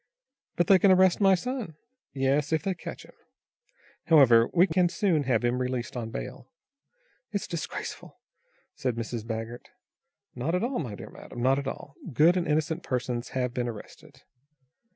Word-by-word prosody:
"But 175 Hz, -, +2 dB
they 190 Hz, +2 st, +6 dB
can 200 Hz, -, +5 dB
arrest 185 Hz, +1 st, +5 dB
my 195 Hz, -1 st, +6 dB
son." 245 Hz, -, -4 dB, 0.4 s
"Yes 140 Hz, +2 st, 0 dB
if 160 Hz, -, +1 dB
they 195 Hz, -1 st, 0 dB
catch 175 Hz, -, -9 dB
him. -, -, -18 dB, 0.9 s
However, 120 Hz, -8 st, +6 dB
we 180 Hz, +1 st, +5 dB
can 175 Hz, 0 st, +2 dB
soon 175 Hz, -6 st, +1 dB
have 120 Hz, -3 st, +1 dB
him 120 Hz, +1 st, +1 dB
released 125 Hz, -1 st, -3 dB
on 115 Hz, -2 st, -4 dB
bail." 110 Hz, -, -7 dB, 0.8 s
"It's 200 Hz, -2 st, -2 dB
disgraceful," 170 Hz, -4 st, -6 dB, 0.5 s
said 125 Hz, -3 st, -2 dB
Mrs. 115 Hz, -1 st, -4 dB
Baggert. 115 Hz, +1 st, -5 dB, 0.6 s
"Not 140 Hz, +8 st, -2 dB
at 180 Hz, -, 0 dB
all, 250 Hz, +2 st, -1 dB
my 120 Hz, -10 st, -4 dB
dear -, -, -10 dB
madam, 120 Hz, -, -8 dB
not 135 Hz, +2 st, +3 dB
at 140 Hz, -, -5 dB
all. 140 Hz, +1 st, -6 dB, 0.2 s
Good 160 Hz, +8 st, +5 dB
and 180 Hz, -2 st, 0 dB
innocent 155 Hz, +2 st, 0 dB
persons 125 Hz, -3 st, -3 dB
have 125 Hz, -1 st, -1 dB
been 120 Hz, -1 st, -2 dB
arrested." 110 Hz, -3 st, -10 dB
140 Hz, 165 wpm, -27 LUFS, 120-175 Hz, 0.9 s, they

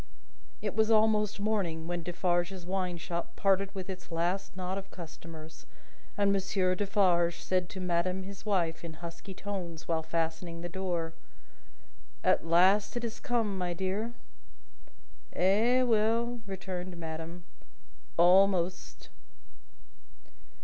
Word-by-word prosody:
It 205 Hz, -2 st, -2 dB
was 220 Hz, 0 st, +3 dB
almost 215 Hz, -2 st, +3 dB
morning, 195 Hz, -7 st, 0 dB
when 175 Hz, 0 st, -2 dB
Defarge's 175 Hz, +1 st, -1 dB
wine 185 Hz, -1 st, -1 dB
shop 170 Hz, +1 st, -4 dB
parted 195 Hz, 0 st, +2 dB
with 190 Hz, -1 st, -5 dB
its 185 Hz, -2 st, -7 dB
last 175 Hz, +4 st, -1 dB
knot 185 Hz, +1 st, -2 dB
of 195 Hz, -, -11 dB
customers, 160 Hz, -2 st, -10 dB, 0.5 s
and 200 Hz, -1 st, +4 dB
Monsieur 190 Hz, -1 st, +1 dB
Defarge 185 Hz, -3 st, +2 dB
said 185 Hz, -1 st, 0 dB
to 190 Hz, -, -7 dB
madame 180 Hz, +1 st, 0 dB
his 195 Hz, +1 st, -9 dB
wife, 175 Hz, -6 st, 0 dB
in 165 Hz, -1 st, -6 dB
husky 170 Hz, +3 st, -8 dB
tones, 175 Hz, -5 st, -5 dB
while 165 Hz, -1 st, +1 dB
fastening 165 Hz, +1 st, -2 dB
the 175 Hz, -, -4 dB
door: 175 Hz, -3 st, -2 dB, 1.1 s
"At -, -, +3 dB
last 190 Hz, +7 st, +4 dB
it 240 Hz, -, -3 dB
is 230 Hz, -1 st, -4 dB
come, 230 Hz, -5 st, 0 dB
my 175 Hz, -1 st, -1 dB
dear!" 195 Hz, +6 st, -2 dB, 1.2 s
"Eh 225 Hz, +8 st, +4 dB
well!" 230 Hz, +1 st, +2 dB
returned 185 Hz, -2 st, -5 dB
madame. 165 Hz, +1 st, -6 dB, 0.7 s
"Almost." 180 Hz, 0 st, +3 dB
185 Hz, 120 wpm, -31 LUFS, 170-200 Hz, 1.2 s, and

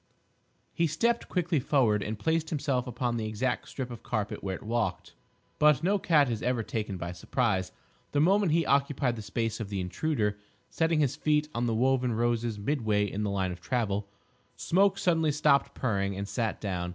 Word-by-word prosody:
He 170 Hz, -1 st, +2 dB
stepped 230 Hz, +11 st, 0 dB
quickly 170 Hz, -4 st, +1 dB
forward 125 Hz, -6 st, +2 dB
and 105 Hz, +2 st, -3 dB
placed 160 Hz, +4 st, 0 dB
himself 135 Hz, -4 st, -1 dB
upon 120 Hz, 0 st, -2 dB
the 110 Hz, -1 st, -2 dB
exact 120 Hz, +4 st, -2 dB
strip 130 Hz, -2 st, -5 dB
of 120 Hz, -, -8 dB
carpet 105 Hz, -1 st, -3 dB
where 95 Hz, -1 st, -2 dB
it -, -, -10 dB
walked. 115 Hz, -4 st, -2 dB, 0.5 s
But 150 Hz, -1 st, +5 dB
no 200 Hz, +3 st, +2 dB
cat 150 Hz, -6 st, +4 dB
is 115 Hz, -3 st, -2 dB
ever 125 Hz, -2 st, 0 dB
taken 105 Hz, -3 st, -3 dB
by 85 Hz, 0 st, -4 dB
surprise! 95 Hz, -1 st, -1 dB, 0.4 s
The 145 Hz, -, +1 dB
moment 190 Hz, +3 st, +4 dB
he 165 Hz, 0 st, +2 dB
occupied 140 Hz, -2 st, +1 dB
the 110 Hz, -, -6 dB
space 115 Hz, +1 st, -2 dB
of 110 Hz, -3 st, -5 dB
the 100 Hz, -2 st, -3 dB
Intruder, 105 Hz, -, -1 dB, 0.3 s
setting 160 Hz, -1 st, +1 dB
his 140 Hz, -2 st, +1 dB
feet 150 Hz, 0 st, +1 dB
on 120 Hz, +1 st, -1 dB
the 115 Hz, -, 0 dB
woven 130 Hz, 0 st, +2 dB
roses 120 Hz, -1 st, 0 dB
midway 105 Hz, -3 st, 0 dB
in 105 Hz, -, -3 dB
the 105 Hz, -, 0 dB
line 95 Hz, -2 st, -1 dB
of 90 Hz, -1 st, -8 dB
travel, 105 Hz, -1 st, -1 dB, 0.5 s
Smoke 195 Hz, +2 st, +2 dB
suddenly 165 Hz, -5 st, +2 dB
stopped 140 Hz, -1 st, +2 dB
purring 100 Hz, -5 st, -1 dB
and 100 Hz, +1 st, -4 dB
sat 110 Hz, +2 st, -2 dB
down. 90 Hz, -4 st, -3 dB
120 Hz, 190 wpm, -29 LUFS, 105-150 Hz, 0.5 s, But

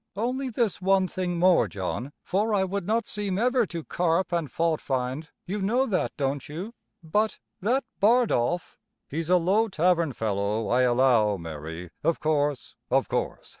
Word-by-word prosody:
Only 255 Hz, +5 st, -1 dB
this 225 Hz, -5 st, -1 dB
one 190 Hz, 0 st, +3 dB
thing 180 Hz, -1 st, -2 dB
more, 175 Hz, -9 st, +4 dB
John, 100 Hz, +8 st, -4 dB
for 210 Hz, +3 st, +1 dB
I 195 Hz, -, +3 dB
would 195 Hz, -1 st, -3 dB
not 225 Hz, +2 st, +1 dB
seem 200 Hz, -2 st, -2 dB
ever 245 Hz, 0 st, +2 dB
to 170 Hz, -2 st, -5 dB
carp 175 Hz, +3 st, 0 dB
and 170 Hz, -4 st, -1 dB
faultfind 150 Hz, -3 st, -1 dB, 0.2 s
you 200 Hz, +3 st, -3 dB
know 240 Hz, +7 st, +2 dB
that, 200 Hz, -7 st, 0 dB
don't 140 Hz, -1 st, -2 dB
you? 180 Hz, +10 st, -6 dB, 0.3 s
but 210 Hz, +7 st, 0 dB, 0.2 s
that 240 Hz, +8 st, +1 dB, 0.2 s
Bardolph 200 Hz, -, +2 dB
" -, -, -55 dB
"He's 160 Hz, +3 st, -3 dB
a 180 Hz, -, +6 dB
low 195 Hz, +6 st, +2 dB
tavern 170 Hz, -5 st, +2 dB
fellow, 105 Hz, 0 st, -1 dB
I 125 Hz, +1 st, +3 dB
allow, 120 Hz, -4 st, +3 dB
Mary 80 Hz, +1 st, -7 dB
of 165 Hz, -, +1 dB
course, 145 Hz, -3 st, 0 dB, 0.2 s
of -, -, +2 dB
course. -, -, -3 dB
170 Hz, 165 wpm, -26 LUFS, 130-205 Hz, 0.3 s, a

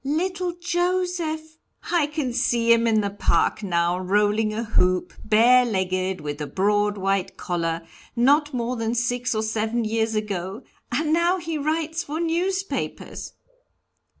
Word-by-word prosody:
"Little 355 Hz, +5 st, -1 dB
Joseph, 350 Hz, -3 st, -1 dB, 0.3 s
I 340 Hz, -4 st, +3 dB
can 295 Hz, -5 st, -3 dB
see 235 Hz, -1 st, +3 dB
him 230 Hz, 0 st, +2 dB
in 220 Hz, -1 st, +3 dB
the 200 Hz, -1 st, -2 dB
park 195 Hz, -1 st, +1 dB
now, 175 Hz, -2 st, +1 dB
rolling 210 Hz, +3 st, +2 dB
a 220 Hz, +2 st, -2 dB
hoop, 185 Hz, -5 st, +1 dB
bare 235 Hz, +4 st, +5 dB
legged, 185 Hz, -4 st, -1 dB
with 145 Hz, 0 st, -5 dB
a 150 Hz, -, -3 dB
broad 205 Hz, +3 st, +1 dB
white 195 Hz, -1 st, -1 dB
collar, 165 Hz, -1 st, -2 dB, 0.3 s
not 290 Hz, +5 st, +3 dB
more 245 Hz, -1 st, -2 dB
than 230 Hz, +1 st, -1 dB
six 245 Hz, 0 st, 0 dB
or 215 Hz, -, 0 dB
seven 220 Hz, +1 st, -1 dB
years 220 Hz, 0 st, 0 dB
ago 200 Hz, +1 st, -3 dB, 0.3 s
and 305 Hz, +5 st, +1 dB
now 345 Hz, +3 st, +3 dB
he 330 Hz, -2 st, -4 dB
writes 320 Hz, +2 st, -1 dB
for 310 Hz, 0 st, -4 dB
newspapers!" 370 Hz, +4 st, -2 dB
235 Hz, 145 wpm, -24 LUFS, 200-315 Hz, 0.3 s, bare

